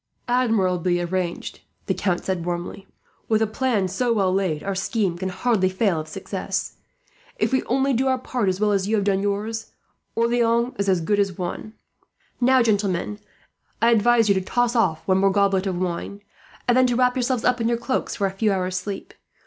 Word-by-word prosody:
"Admirably 190 -8 +1
arranged," 175 0 -3 0.3
the - - 0
Count 180 -3 -1
said 185 -3 -1
warmly. 175 +3 -5 0.4
"With 220 -1 +3
a - - +3
plan 220 -3 0
so 235 +7 -1
well 195 -5 +2
laid, 185 -6 -1
our 195 - -2
scheme 190 -1 -1
can 190 +2 -3
hardly 190 -1 +1
fail 190 -3 +1
of 155 - -6
success. - - -4 0.6
If - - 0
we 260 - +3
only 270 +2 +1
do 260 +3 +1
our 260 0 +2
part 245 -5 -1
as 185 0 -2
well 210 0 +2
as 195 -1 +1
you 220 - +1
have 205 -2 0
done 195 -1 +2
yours, 210 +3 -3 0.4
Orleans 235 +1 +2
is 200 0 +1
as 185 -3 +2
good 205 +5 +1
as 195 -3 0
won. 185 +4 -5 0.7
"Now, 255 0 +4
gentlemen, 205 -2 0 0.6
I 230 +2 +4
advise 230 0 +4
you 200 - +5
to 190 - 0
toss 240 +5 0
off 160 -9 +1
one 190 0 +3
more 195 0 +4
goblet 195 -1 +2
of 185 -2 -2
wine, 185 +3 -4 0.4
and 240 - +4
then 255 0 +5
to 245 - 0
wrap 250 0 +3
yourselves 255 -1 0
up 250 -1 +2
in 230 - +1
your 235 - +1
cloaks 250 +3 -2
for 200 - 0
a 195 - 0
few 205 +2 0
hours' 185 -1 -1
sleep. 195 +1 -6
205 Hz, 200 wpm, -23 LUFS, 185-235 Hz, 0.7 s, you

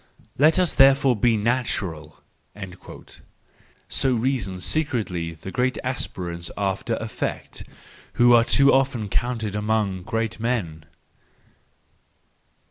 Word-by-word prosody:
Let 155 +6 +4
us 180 -2 +2
therefore 135 -1 +5
be 115 +1 +2
natural! 105 -9 -2 0.3
"—so 95 +6 -6
reason 115 -6 -1
secretly 95 - -1
the 90 +4 -9
great 125 +3 0
aspirants 90 -9 -4
after 100 -1 -1
effect, - - -5 0.5
who 120 0 +5
are 115 -1 +6
too 140 +3 +4
often 130 -6 +1
counted 115 -2 -2
among 105 -3 -1
great 115 +4 -3
men. 100 -10 -2
110 Hz, 100 wpm, -23 LUFS, 95-130 Hz, 0.5 s, are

